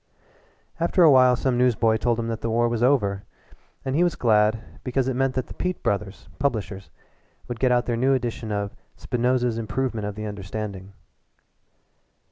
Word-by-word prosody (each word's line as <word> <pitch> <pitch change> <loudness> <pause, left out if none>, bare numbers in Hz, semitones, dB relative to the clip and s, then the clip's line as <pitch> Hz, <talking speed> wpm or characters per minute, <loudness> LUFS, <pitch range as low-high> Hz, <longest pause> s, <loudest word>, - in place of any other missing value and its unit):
After 170 +2 +3
a 160 - +8
while 130 -2 +6
some 125 0 0
newsboy 115 -3 +3
told 120 +1 0
him 115 - -2
that 115 - -4
the 115 - -2
war 120 +1 +2
was 120 -1 -2
over, 105 -7 +2 0.6
and 135 0 -1
he 170 - +4
was 175 -2 +1
glad, 110 -1 +3 0.2
because 130 0 -1
it 130 - 0
meant 135 0 0
that 130 - -4
Peat 180 -1 -2
Brothers, 100 -1 -2
publishers, 105 -8 -2 0.6
would 120 -2 -5
get 130 0 +2
out 125 0 +2
their 120 - -1
new 130 +3 +2
edition 120 -3 -3
of 100 -1 -3 0.2
"Spinoza's 125 -1 0
Improvement 115 -2 -2
of 105 - -5
the 110 +1 -5
Understanding." 100 -1 -6
120 Hz, 170 wpm, -24 LUFS, 105-130 Hz, 0.6 s, a